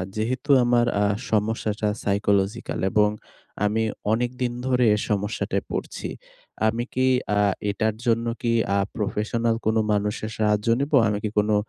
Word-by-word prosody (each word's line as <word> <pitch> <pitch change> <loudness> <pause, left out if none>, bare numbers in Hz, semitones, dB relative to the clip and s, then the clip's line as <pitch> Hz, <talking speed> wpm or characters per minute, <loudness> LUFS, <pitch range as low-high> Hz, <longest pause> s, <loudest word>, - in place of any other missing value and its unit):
যেহেতু 125 +6 -2
আমার 120 0 +3 0.2
আ - - +3 0.3
সমস্যাটা 110 0 0
psychological 100 +2 0
এবং 105 -1 +4 0.6
আমি 110 +2 +1 0.3
অনেকদিন 125 +1 -1
ধরে 125 -1 +2
এই 105 - -2
সমস্যাটায় 105 +1 -1
পড়ছি। - - -4 0.6
আমি 115 +2 0
কি 130 0 +1 0.3
আ - - +3 0.3
এটার 110 +2 -1
জন্য 115 -1 +2 0.2
কি 120 - +1 0.2
আ - - +3 0.2
প্রফেশনাল 115 +2 -1
কোনো 110 +1 +2
মানুষের 105 +1 -2
সাহায্য 105 -1 +1
নিবো? 140 +1 +2
আমি 105 -1 0
কি 110 - 0
কোনো 105 0 +2
110 Hz, 140 wpm, -24 LUFS, 105-120 Hz, 0.6 s, এবং